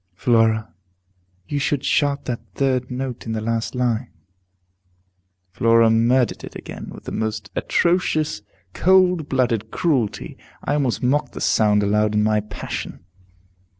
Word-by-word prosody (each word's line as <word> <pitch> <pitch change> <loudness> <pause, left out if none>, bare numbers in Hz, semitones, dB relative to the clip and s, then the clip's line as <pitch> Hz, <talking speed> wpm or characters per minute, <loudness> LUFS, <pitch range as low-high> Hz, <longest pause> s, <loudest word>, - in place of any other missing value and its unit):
"Flora, 110 +1 +2 0.7
you 145 - -2
should 140 0 -1
sharp 145 -1 +1
that 120 -2 -2 0.2
third 130 -2 0
note 125 -1 -5
in 110 - -2
the 110 - -2
last 115 +2 -2
line." 125 -1 -1 1.4
Flora 115 +2 +4
murdered 120 +2 +2
it - - -9
again, - - -8
with - - -11
the - - -7
most 110 -3 -3
atrocious, 155 - +1 0.3
cold 180 -4 +3
blooded 120 -4 0
cruelty. 130 - -1 0.3
I 145 - 0
almost 135 -5 0
mocked 140 +4 +1
the - - -7
sound 105 -1 +3
aloud 105 +1 +1
in 105 - +3
my 110 0 +2
passion. 105 0 -6
120 Hz, 135 wpm, -21 LUFS, 110-140 Hz, 1.4 s, Flora